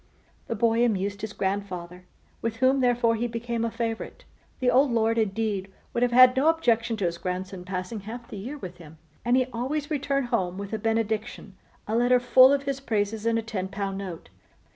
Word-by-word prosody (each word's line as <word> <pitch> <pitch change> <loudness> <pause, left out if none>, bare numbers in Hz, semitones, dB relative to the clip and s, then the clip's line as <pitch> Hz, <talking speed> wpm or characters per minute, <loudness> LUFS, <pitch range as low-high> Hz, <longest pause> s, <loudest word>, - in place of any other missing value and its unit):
The 230 - -2
boy 230 +2 +2
amused 200 -3 0
his 220 - -4
grandfather, 185 -3 -4 0.4
with 230 -1 -2
whom, 260 +3 +3
therefore, 245 -2 +3
he 230 +2 -1
became 235 0 -3
a 230 - 0
favourite. 230 0 -4 0.3
The 250 -1 +2
old 270 +2 +4
Lord, 230 0 +2
indeed, 205 -2 -1 0.2
would 235 - -1
have 245 0 +3
had 255 +1 +7
no 270 +4 +2
objection 230 -8 +1
to 200 - -1
his 170 0 -2
grandson 185 0 -4
passing 185 +3 -4
half 230 +4 -8
the - - -8
year 250 +10 -6
with 180 -9 -8
him; 160 -2 -13 0.3
and 240 +2 +3
he 255 - +3
always 280 +6 -3
returned 275 -3 -1
home 180 -3 0
with 200 +1 -6
a 220 - -1
benediction, 220 -2 -2 0.3
a 220 - -1
letter 245 +1 +4
full 255 +2 +7
of 280 -1 +1
his 275 -1 -2
praises, 220 -3 -1
and 230 0 +2
a 225 - -1
ten 205 -5 -3
pound 195 0 -4
note. 185 -4 -7
225 Hz, 200 wpm, -26 LUFS, 200-245 Hz, 0.4 s, had